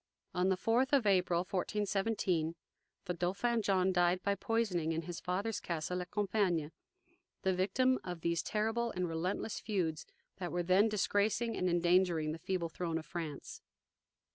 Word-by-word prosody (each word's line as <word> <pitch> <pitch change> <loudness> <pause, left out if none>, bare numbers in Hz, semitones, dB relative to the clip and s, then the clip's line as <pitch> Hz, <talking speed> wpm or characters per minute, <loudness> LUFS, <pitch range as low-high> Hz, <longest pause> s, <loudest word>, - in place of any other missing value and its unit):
On 180 +1 +2
the 190 - +2
fourth 245 +7 +1
of 270 -5 +4
April, 180 -3 +3
1417, 195 -3 -1 0.5
the 180 - -1
Dauphin 195 +7 0
John 190 -2 +2
died 180 0 +2
by 200 - +2
poisoning, 200 -6 0
in 165 +1 -2
his 175 +1 -6
father's 195 +4 -2
castle 175 +2 -3
at 180 - -7
Compiegne 190 -7 0 0.7
the 190 - +2
victim 245 +8 +2
of 175 -2 -6
those 170 0 +1
terrible 225 +2 0
and 180 -3 -2
relentless 175 +6 -2
feuds 175 -8 -2 0.3
that 180 -2 -4
were 175 0 -1
then 190 +5 +4
disgracing 215 +2 +1
and 185 - 0
endangering 175 -2 +3
the 160 - -5
feeble 180 -2 -1
throne 165 0 -2
of 160 - -6
France. 165 -6 -6
185 Hz, 155 wpm, -34 LUFS, 175-205 Hz, 0.7 s, of